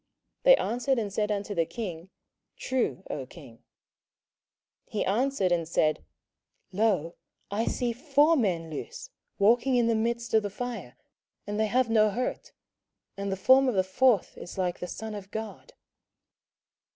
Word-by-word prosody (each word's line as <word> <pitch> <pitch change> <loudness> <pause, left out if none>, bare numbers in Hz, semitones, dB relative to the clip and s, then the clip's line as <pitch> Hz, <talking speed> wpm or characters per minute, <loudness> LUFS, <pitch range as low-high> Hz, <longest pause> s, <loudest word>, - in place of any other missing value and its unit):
They - - +8
answered 260 - 0
and 210 -4 -2
said 210 0 0
unto 205 0 -2
the 165 -4 0
king, 185 -7 -6 0.5
True, 260 -1 -1
O - - -5
king. - - -14 1.3
27:003:025 - - -24
He 210 - 0
answered 220 -2 +1
and 170 -2 +1
said, 155 -2 +1 0.7
Lo, 190 -5 +1 0.4
I 215 +3 0
see 240 -2 -1
four 290 +5 +3
men 175 - 0
loose, - - -7 0.3
walking 235 +6 +3
in 240 -1 +3
the 230 - +2
midst 235 +1 -1
of 220 - +5
the 205 - -3
fire, 205 - -6 0.5
and 205 +1 -3
they 220 - +2
have 245 +1 +1
no 215 -1 +5
hurt; 250 - -3 0.6
and 200 0 -3
the 190 - -2
form 260 +7 +5
of 240 - -2
the 190 - +3
fourth 215 +2 +2
is 175 - -9
like 180 -2 -1
the 180 - -5
Son 220 +4 -6
of 200 -2 -8
God. 220 - -7
220 Hz, 160 wpm, -28 LUFS, 190-245 Hz, 1.3 s, They